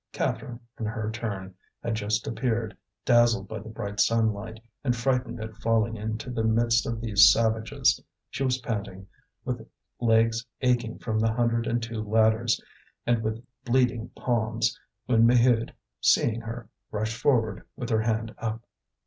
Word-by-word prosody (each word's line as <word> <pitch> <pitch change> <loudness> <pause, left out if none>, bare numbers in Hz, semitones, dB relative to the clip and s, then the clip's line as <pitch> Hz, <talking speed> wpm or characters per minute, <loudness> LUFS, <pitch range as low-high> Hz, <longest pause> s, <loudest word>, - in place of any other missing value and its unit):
Catherine, 120 -1 -2 0.2
in 110 - -2
her 110 -1 -3
turn, 100 -4 -5 0.3
had 115 - -1
just 105 -1 -1
appeared, 115 -2 -1 0.3
dazzled 120 -4 +4
by 110 +2 -5
the 110 +2 -10
bright 100 -2 -5
sunlight, 110 -1 +1 0.2
and 125 -3 +1
frightened 125 -1 -1
at 110 0 -6
falling 115 0 +1
into 110 +3 -4
the 115 -2 -1
midst 115 +1 +2
of 115 -1 -2
these 105 -3 +7
savages. 110 -1 +2 0.3
She - - -5
was 130 -1 +2
panting, 105 -6 -5 0.4
with 120 -2 -4 0.3
legs 115 -1 +3 0.2
aching 120 -3 +1
from 110 -2 -2
the 110 0 +2
hundred 115 0 +1
and 120 0 0
two 115 -1 -4
ladders, 110 +2 +2 0.5
and 120 -1 +2
with 110 +2 -3 0.2
bleeding 120 -2 +1
palms, 115 -1 0 0.3
when 115 -2 +4
Maheude, 120 -1 +4 0.3
seeing 115 0 +3
her, 115 0 -7 0.2
rushed 110 +1 -2
forward 115 -8 +2
with 120 -1 -5
her 110 -1 +3
hand 110 0 -1
up. 115 0 -3
115 Hz, 150 wpm, -27 LUFS, 110-120 Hz, 0.5 s, these